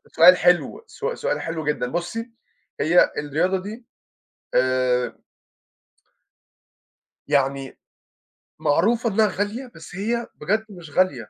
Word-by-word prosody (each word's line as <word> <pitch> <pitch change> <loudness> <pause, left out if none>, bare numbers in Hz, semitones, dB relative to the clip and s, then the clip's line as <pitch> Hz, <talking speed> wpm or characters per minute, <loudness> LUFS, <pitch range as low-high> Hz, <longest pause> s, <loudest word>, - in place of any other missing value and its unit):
سؤال 180 +3 +8
حلو، 180 - +2
سو 480 +1 -4
سؤال - - -2
حلو 165 -2 -4
جدًا، 150 -4 0
بُصي 225 +8 -4 0.5
هي 170 +4 +4
الرياضة 165 +6 0
دي 225 +4 -8 0.7
آآ 125 -1 +2 2.1
يعني 135 -1 0 0.8
معروفة 225 +10 +2
إنّها 215 +1 +3
غالية 210 +6 -3
بس 165 +2 -11
هي 235 +4 -2
بجد 215 +8 -1
مش 175 -7 -11
غالية، 140 - +1
180 Hz, 105 wpm, -23 LUFS, 145-220 Hz, 2.1 s, سؤال